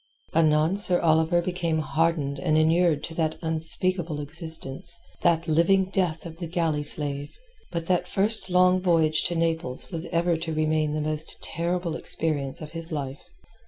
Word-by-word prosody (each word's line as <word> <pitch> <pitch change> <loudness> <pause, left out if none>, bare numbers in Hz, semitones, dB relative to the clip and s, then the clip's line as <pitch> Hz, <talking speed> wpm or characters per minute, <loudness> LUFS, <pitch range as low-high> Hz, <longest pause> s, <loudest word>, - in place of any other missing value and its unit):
Anon 155 +3 +2
Sir 185 -3 +6
Oliver 160 +2 +2
became 170 -2 -2
hardened 155 -3 -1
and 155 +2 +1
inured 160 -1 +2
to 165 - -6
that 160 -1 -2
unspeakable 160 0 +2
existence, 160 0 0 0.2
that 170 -1 +1
living 185 +4 +2
death 180 -5 -1
of 165 -1 -9
the 170 -1 -6
galley 160 -3 -1
slave. 145 -1 +3 0.3
But 170 -1 -4
that 180 0 0
first 210 +1 -1
long 180 0 +3
voyage 160 -4 +2
to 175 - 0
Naples 165 -5 -2
was 165 -1 -2
ever 170 -1 0
to 160 0 -4
remain 155 -1 0
the 155 - -2
most 155 +1 -3
terrible 170 0 -3
experience 145 -4 -3
of 155 - -8
his 165 +1 -6
life. 140 -2 -5
165 Hz, 160 wpm, -25 LUFS, 155-175 Hz, 0.3 s, Sir